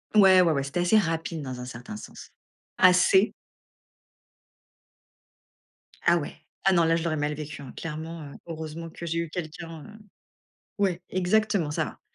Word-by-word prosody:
Ouais, 190 -3 +8
ouais, 170 -3 +4
ouais, 140 -2 0
c'était 140 +6 -2
assez 180 +5 +4
rapide 165 -4 -1
dans 130 -3 -6
un 125 - -6
certain 125 -3 -8
sens, - - -11 0.5
assez 185 +2 +5 2.7
Ah, - - +5
ouais, - - -5 0.3
ah, 195 - +5
non 170 - +4
là 165 0 +3
je 165 - -1
l'aurais 155 -2 -1
mal 150 0 -1
vécu 150 -1 -7
hein, 135 -3 -9
clairement, 160 0 -6
heu, - - -12
heureusement 160 0 -6
que 170 - -8
j'ai 165 0 -1
eu 170 -2 -3
quelqu'un, 165 -1 -6
heu, 215 0 -13 0.8
ouais 185 -4 +1
exactement 185 -2 +1
ça - - 0
va, - - -9
165 Hz, 165 wpm, -27 LUFS, 150-180 Hz, 2.7 s, Ouais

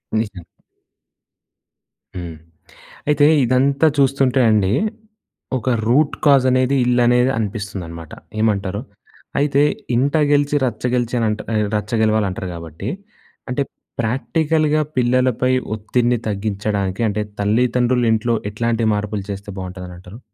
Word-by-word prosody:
నిజం. 105 -5 -2 1.7
హ్మ్. 85 -3 -6 0.7
అయితే 145 -1 +4 0.2
ఇదంతా 135 +5 +3
చూస్తుంటే 135 -1 +3
అండి, 105 -3 +3 0.9
ఒక 130 - -2 0.2
రూట్ 140 +5 +3
కాజ్ 140 -3 +5
అనేది, 130 +2 +2
ఇల్లనేది 125 +1 +3
అనిపిస్తుందనమాట. 100 -7 -5 0.3
ఏమంటారు? 100 -2 0 0.6
అయితే 140 0 +2 0.3
ఇంట 140 +5 +1 0.2
గెలిచి 145 0 +2
రచ్చ 115 -4 -4
గెలిచానంట్ 115 -3 0
ఎ - - +3 0.2
రచ్చ 105 0 -3
గెలవాలి 110 -1 +2
అంటారు 95 0 -5
కాబట్టి, 85 +4 -7 0.6
అంటే 125 +3 -1 0.4
ప్రాక్టికల్‌గా 155 +6 +1 0.2
పిల్లలపై 125 0 +2 0.2
ఒత్తిడిని 120 +3 0
తగ్గించడానికి, 100 -1 -2
అంటే 105 +1 -1 0.2
తల్లిదండ్రులు 120 +3 +2
ఇంట్లో 115 +1 +1 0.2
ఎట్లాంటి 115 +1 0
మార్పులు 105 -1 -3
చేస్తే 100 +1 -7
బాగుంటుందని 90 -1 -7
అంటారు? 95 +5 -12
115 Hz, 105 wpm, -20 LUFS, 100-130 Hz, 1.7 s, కాజ్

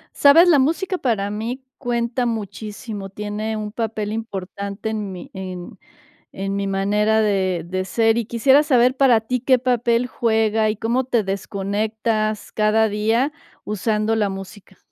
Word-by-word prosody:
¿Sabes? 325 +5 +7
La 315 -5 +6
música 350 +7 0
para 215 - 0
mí 230 +5 -4
cuenta 240 -1 -1
muchísimo, 210 -1 -5
tiene 210 +2 -4
un 210 -1 -5
papel 220 -2 -3
importante 200 -1 -5
en 210 -3 -4
mi 180 -1 -9
en 185 -2 -7 0.5
en 195 +1 -3
mi 200 0 -1
manera 210 +3 +2
de 190 -4 0
de 185 +2 -3
ser, 225 +4 +2
y 235 - -2
quisiera 265 +5 +4
saber 255 -3 +3
para 260 -4 +5
ti 250 +3 -2
qué 255 +1 +3
papel 245 -1 +1
juega, 220 -2 +1
y 215 - -3
cómo 235 +5 0
te 240 -4 +1
desconectas 215 +2 -2
cada 215 +1 +3
día 225 +7 +1 0.3
usando 215 +1 0
la 210 -2 +1
música. 195 0 -9
220 Hz, 150 wpm, -21 LUFS, 200-235 Hz, 0.5 s, Sabes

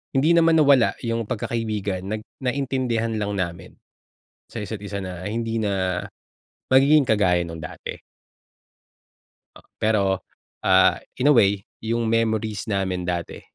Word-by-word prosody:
hindi 145 +5 +4
naman 165 -1 +5
nawala 140 -6 +5
yung 115 -2 -2
pagkakaibigan, 105 -5 -3
nag 110 +1 -4 0.2
naintindihan 125 -3 -1
lang 105 -1 -2
namin 85 -3 -4 0.7
sa 115 - -7
isa't 110 +1 -5
isa 100 0 -5
na, 90 0 -6
hindi 115 +1 -2
na 95 -4 -1 0.7
magiging 140 +2 +5
kagaya 95 -5 +3
nung 85 -1 -6
dati. 80 - -8 1.8
Pero, 100 -3 +1 0.4
ah, 95 -1 +5 0.2
in 130 - +3
a - - +6
way 100 -3 +3 0.2
yung 115 0 0
memories 110 -2 0
namin 95 -2 -1
dati, 85 -1 -3
110 Hz, 125 wpm, -23 LUFS, 95-115 Hz, 1.8 s, a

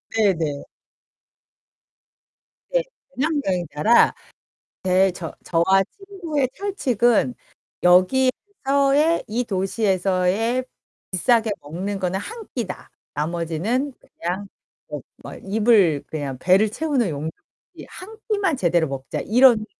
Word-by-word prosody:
네 210 -3 +4
네. 145 -3 -2 2.1
네. - - +1 0.3
배낭여행자라 230 - +2 0.7
네 185 +1 +3
저 175 -2 -7
저와 190 +3 +3
친구의 350 -9 -3
철칙은 250 - +1 0.5
'여기에서의 275 - +3
이 235 +4 -1
도시에서의 195 +3 0 0.5
비싸게 225 +4 +2
먹는 190 +7 -4
거는 185 +1 -1
1 450 - -8
끼다.' 205 -7 -5 0.2
나머지는 170 - -2
그냥 185 +4 -5 0.4
뭐 - - -6 0.2
뭐 - - -8
입을 200 -7 +2
그냥 145 -4 -4
배를 195 +6 +4
채우는 275 - 0
용이지 155 +1 -4 0.5
'1 435 +4 -11
끼만 395 -8 +1
제대로 170 -5 +2
먹자.' 135 -1 -5
이런 235 -2 +5
210 Hz, 205 characters per minute, -22 LUFS, 180-265 Hz, 2.1 s, 이런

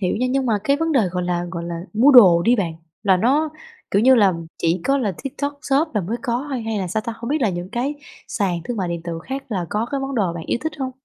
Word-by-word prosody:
hiểu 180 -3 0
nha, 250 +4 0
nhưng 265 -1 0
mà 220 -3 +2
cái 280 +3 +3
vấn 325 +2 -1
đề, 270 - +4
gọi 180 0 -2
là 175 0 -1
gọi 170 -1 -5
là, 170 0 -5
mua 235 +7 +5
đồ 190 -10 +8
đi 240 +6 +4
bạn, 175 -5 -1 0.3
là 195 -3 +4
nó, 275 +11 +2 0.4
kiểu 200 +2 +2
như 260 +1 +7
là, 205 -6 +5 0.3
chỉ 170 +1 +1
có 275 +1 +2
là 215 -7 -1
TikTok 285 +2 -4
Shop 280 +4 +1
là 210 - +2
mới 200 +6 -3
có 250 +1 -2
thôi, 255 -4 -2
hay 225 -1 -2
là 190 - -2
sao 215 +5 -1
ta? 230 - -2
Hông 235 +1 -6
biết 300 +2 0
là 230 - +3
những 175 0 -5
cái 250 +6 -2 0.3
sàn 185 -5 -1
thương 245 - -4
mại 185 -4 -2
điện 170 -1 -4
tử 165 -1 -5
khác 270 +1 -4
là 185 -6 -2
có 215 +3 -1
cái 275 - -2
món 270 0 -4
đồ 195 -8 +1
bạn 165 -1 -7
yêu - - 0
thích 315 - -2
hông? 265 -1 -2
225 Hz, 290 wpm, -21 LUFS, 180-270 Hz, 0.4 s, đồ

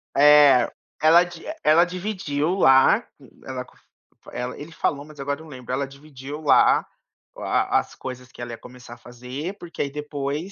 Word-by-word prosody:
É. 145 -3 +6 0.3
Ela 165 +3 +6
di 175 -2 -11 0.2
ela 165 +3 +5
dividiu 180 -4 -2
lá. 135 -8 +5 0.4
Ela 130 -1 -5
cof - - -24 0.5
ela 125 +1 -5
ele 150 +3 -9
falou, 140 -3 -2
mas 155 0 -15
agora 140 +1 -3
eu - - -11
não 160 - -14
lembro. 130 -1 -7
Ela 135 +1 -1
dividiu 140 0 -10
lá 150 - +4 0.5
a - - +1
a - - +5
as - - -8
coisas 125 0 -8
que 125 - -12
ela 120 0 -6
ia 115 - -7
começar 125 0 -13
a - - -19
fazer, 125 - -7
porque 175 -3 -7
aí 140 - -1
depois, 150 +3 -4
145 Hz, 185 wpm, -23 LUFS, 130-155 Hz, 0.5 s, É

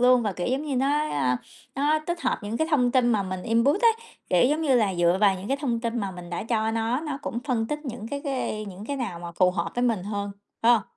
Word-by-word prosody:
luôn. 250 0 +5
Và, 210 -3 -1
kiểu 175 - -3
giống 265 +4 0
như, 285 -4 -2
nó, 265 - +2
a, 145 - +1 0.4
nó 295 +3 +2
tích 345 -1 -2
hợp - - 0
những 210 +3 -3
cái 315 - +1
thông 250 -5 +3
tin 255 -2 +4
mà 210 - +2
mình 185 -1 -4
input 235 - +2
ấy, 460 -1 +7 0.4
kiểu 180 - +4
giống 310 +2 0
như 275 -4 +3
là, 205 -5 +2
dựa 175 0 +3
vào 200 -2 +5
những 190 +2 -7
cái 275 - +1
thông 245 -5 -1
tin 235 0 -2
mà 200 -2 -2
mình 180 -1 -9
đã 175 - -3
cho 220 -1 0
nó, 230 +3 0
nó 300 -3 -4
cũng 235 - -3
phân 240 -5 0
tích 300 +5 -2
những 235 -4 -6
cái 280 +3 -4
cái 255 -6 -2
những 200 0 -8
cái 285 - -2
nào 205 -10 -3
mà 170 0 -7
phù 180 +1 +3
hợp 175 -2 -2
với 245 - 0
mình 225 -6 +1
hơn, 200 0 -3 0.3
phải 235 - +7
hông? 225 -4 +3
230 Hz, 280 wpm, -26 LUFS, 195-275 Hz, 0.4 s, ấy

